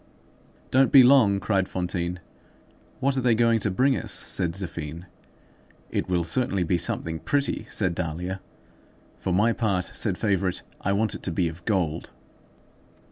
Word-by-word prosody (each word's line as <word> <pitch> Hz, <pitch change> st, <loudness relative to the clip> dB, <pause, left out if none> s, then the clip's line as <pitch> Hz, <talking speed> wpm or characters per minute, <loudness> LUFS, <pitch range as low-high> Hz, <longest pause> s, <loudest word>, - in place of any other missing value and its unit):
"Don't 135 Hz, 0 st, +4 dB
be 135 Hz, -2 st, +9 dB
long!" 120 Hz, -7 st, +5 dB
cried 95 Hz, -2 st, 0 dB
Fantine. 90 Hz, -1 st, -3 dB, 0.8 s
"What 135 Hz, +1 st, +1 dB
are -, -, +1 dB
they 120 Hz, -2 st, +3 dB
going 115 Hz, 0 st, +3 dB
to 105 Hz, -, +1 dB
bring 130 Hz, +8 st, +2 dB
us?" -, -, -4 dB
said 85 Hz, -3 st, +1 dB
Zéphine. 85 Hz, -3 st, -5 dB, 0.9 s
"It -, -, -2 dB
will 90 Hz, -2 st, +1 dB
certainly 100 Hz, +1 st, 0 dB
be 85 Hz, +1 st, 0 dB
something 80 Hz, 0 st, -2 dB
pretty," 145 Hz, -, 0 dB
said 95 Hz, -5 st, 0 dB
Dahlia. 90 Hz, +3 st, -4 dB, 0.8 s
"For 95 Hz, -, -2 dB
my 105 Hz, +6 st, +3 dB
part," 100 Hz, -7 st, -1 dB
said -, -, -1 dB
Favourite, 95 Hz, -3 st, 0 dB, 0.2 s
"I 100 Hz, -, +1 dB
want 105 Hz, +1 st, +1 dB
it -, -, -7 dB
to 95 Hz, -, -3 dB
be 85 Hz, +1 st, 0 dB
of 85 Hz, +1 st, -8 dB
gold." 85 Hz, -7 st, -1 dB
95 Hz, 155 wpm, -25 LUFS, 85-115 Hz, 0.9 s, be